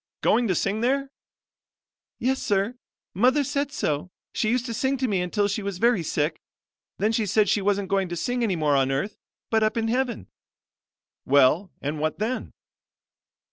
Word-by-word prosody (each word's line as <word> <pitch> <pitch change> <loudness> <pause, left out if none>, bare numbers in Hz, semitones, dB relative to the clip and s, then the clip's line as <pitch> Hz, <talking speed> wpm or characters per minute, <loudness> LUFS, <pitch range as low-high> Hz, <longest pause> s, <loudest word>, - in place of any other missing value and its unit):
"Going 240 -1 +3
to 185 - +1
sing 205 +5 0
there?" 275 +3 0 1.1
"Yes, 265 +3 0
sir. 200 +3 +1 0.4
Mother 255 - +3
said 280 +1 -2
so. 155 - -2 0.2
She 215 - 0
used 250 +1 +1
to 235 - -4
sing 265 +4 0
to 260 0 0
me 195 -5 0
until 200 +3 0
she 205 +2 -2
was 200 -2 -4
very 235 -1 +3
sick. 150 0 -1 0.6
Then 215 +2 +1
she 225 -2 0
said 210 +2 +3
she 200 +2 +2
wasn't 200 0 0
going 195 -2 +1
to 175 - -3
sing 245 +9 -1
any 210 -6 +1
more 150 -3 +2
on 135 -1 +2
earth, 140 +10 -2 0.3
but 220 -1 +3
up 215 +2 +1
in 225 0 0
heaven." 250 -1 -1 1.0
"Well 140 +7 +4
and 145 +2 -2
what 155 +1 -1
then?" 230 +5 -2
210 Hz, 180 wpm, -25 LUFS, 180-245 Hz, 1.1 s, Well